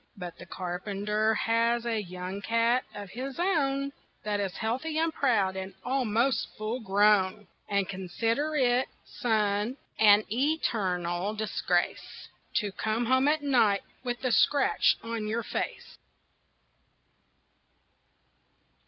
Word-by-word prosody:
But 180 -2 -7
the - - -10
carpenter 205 +4 -1
has 230 +2 +1
a 225 -2 0
young 185 +1 -6
cat 230 +3 +2
of 205 -3 -8
his 260 +3 -5
own 280 -7 +1 0.3
That 210 -1 -1
is 195 -2 -3
healthy 260 +8 -2
and 325 0 +1
proud 205 -10 +2
and 190 0 -6
almost 250 -1 +1
full 215 +4 -3
grown, 205 -1 +3 0.2
And 200 -2 +1
consider 225 - -1
it, 255 -2 +3 0.2
son, 215 +1 0 0.2
an 210 -1 +7
eternal 200 - 0
disgrace 215 0 -2 0.3
To 210 -4 +1
come 220 +4 -1
home 260 +3 +3
at 300 0 +2
night 225 -8 +3 0.2
with 245 0 -3
a 255 - +1
scratch 275 +4 +3
on 230 -2 -3
your 225 +2 -1
face." - - -5
220 Hz, 120 wpm, -28 LUFS, 200-255 Hz, 0.3 s, an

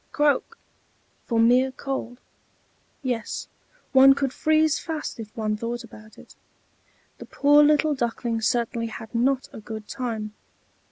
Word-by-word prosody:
croak!" 295 -3 +1 0.7
for 230 -2 +1
mere 250 +3 +4
cold; 260 -2 -5 0.9
yes, 245 -4 -3 0.4
one 270 0 +7
could 275 -2 -1
freeze 315 -1 +2
fast 315 -7 -5
if 220 -2 -7
one 215 -1 -1
thought 235 +2 -4
about 215 +1 -14
it. - - -16 0.8
The - - -9
poor 290 +1 +5
little 300 +1 +3
Duckling 235 -3 -2
certainly 235 0 0
had 225 0 -9
not 260 +3 +1
a - - -8
good 215 -1 -8
time. 220 -4 -4
245 Hz, 130 wpm, -24 LUFS, 225-275 Hz, 0.9 s, one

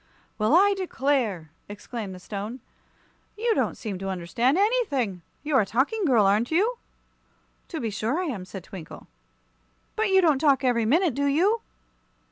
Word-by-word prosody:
"Well, 215 +8 +3
I 400 +3 +5
declare!" 260 - -1 0.2
exclaimed 205 -1 -7
the - - -10
Stone; 210 +6 -6 0.8
"you 460 +1 +1
don't - - -1
seem 200 -5 -5
to 195 0 -4
understand 190 - 0
anything. 290 - 0 0.2
You're 295 -4 +3
a - - 0
Talking 295 - 0
Girl, 235 -9 +4
are 200 +2 +4
you 320 - +1
not?" 480 +2 -10
"To 325 - -4
be 225 -3 -3
sure 225 - -1
I 370 - -1
am," 235 - -4
said 190 -1 -9
Twinkle. 180 -5 -10 0.9
"But 435 -1 +1
you 385 0 +5
don't 315 -7 +3
talk 280 -3 +3
every 240 -3 +2
minute, 325 - +3
do 280 +3 0
you?" 380 +11 +2
260 Hz, 165 wpm, -25 LUFS, -, 0.9 s, I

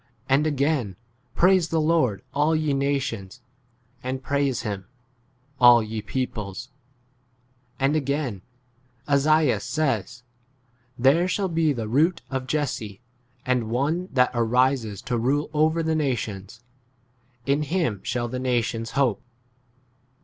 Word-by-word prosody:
And 140 +3 +3
again, 140 - 0 0.4
Praise 185 -2 +4
the 165 - +1
Lord, 155 - +1
all 150 +3 +2
[ye] 155 -2 0
nations, 135 -7 -2 0.6
and 130 +1 -4
praise 140 -2 0
him, 100 -4 -4 0.7
all 120 -2 +7
[ye] 110 0 -4
peoples. 110 -1 -4 1.1
12 - - -17
And 145 - +1
again, 140 -8 -1 0.7
Esaias 150 0 +3
says, 125 - -2 0.7
There 140 +8 +4
shall 190 +1 -1
be 165 -2 +2
the 115 -5 -3
root 160 +9 +2
of 130 -1 -3
Jesse, 120 -8 -2 0.5
and 125 -3 0
one 150 +10 -1
that 125 -2 +3
arises 120 -2 +1
to 125 -3 -1
rule 145 +6 0
over 155 +2 +2
[the] 160 0 0
nations: 115 -8 -3 0.8
in 140 +2 +1
him 150 - -1
shall 120 +3 -2
[the] 125 +2 -4
nations 120 -2 -1
hope. 125 -8 +2
130 Hz, 120 wpm, -24 LUFS, 115-150 Hz, 1.1 s, all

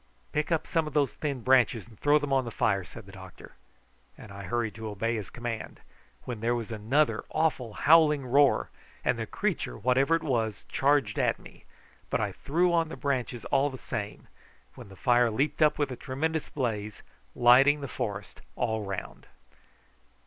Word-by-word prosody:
"Pick 150 +3 -1
up 165 - +1
some 165 -2 0
of 150 - -7
those 145 -3 +2
thin 140 -5 -4
branches 125 -4 +3
and 110 -4 -18
throw 145 +1 +4
them 145 -2 -2
on 135 -1 +3
the 120 - -5
fire," 100 -3 0
said 110 +4 -12
the 95 - -13
doctor; 95 -1 -12 0.6
and 105 - -12
I 100 0 -8
hurried 115 +3 -1
to 110 0 -7
obey 115 +3 -1
his 105 -4 -5
command, 120 -2 -6 0.4
when 120 -3 -5
there 120 +2 +1
was 115 -1 -5
another 120 +8 +1
awful 130 -8 0
howling 150 -2 +4
roar, 140 +2 +3 0.3
and - - +1
the - - -3
creature, - - -2
whatever 135 +6 +2
it 165 - -2
was, 115 -6 -1
charged 140 +1 +1
at - - +2
me; - - -16 0.4
but - - 0
I - - -1
threw 175 +5 0
on 165 -2 +2
the - - -7
branches 130 -4 -2
all 140 +2 +3
the 130 - -8
same, - - -6 0.5
when - - -12
the 95 - -13
fire 120 +4 +3
leaped 140 +8 -1
up 150 0 +4
with 145 -2 -1
a - - -4
tremendous 155 +5 -3
blaze, 110 -6 -3 0.3
lighting 135 +4 +6
the 140 - -4
forest 100 -5 -5
all 110 -1 -1
round. 95 -1 -6
125 Hz, 185 wpm, -28 LUFS, 110-145 Hz, 0.6 s, lighting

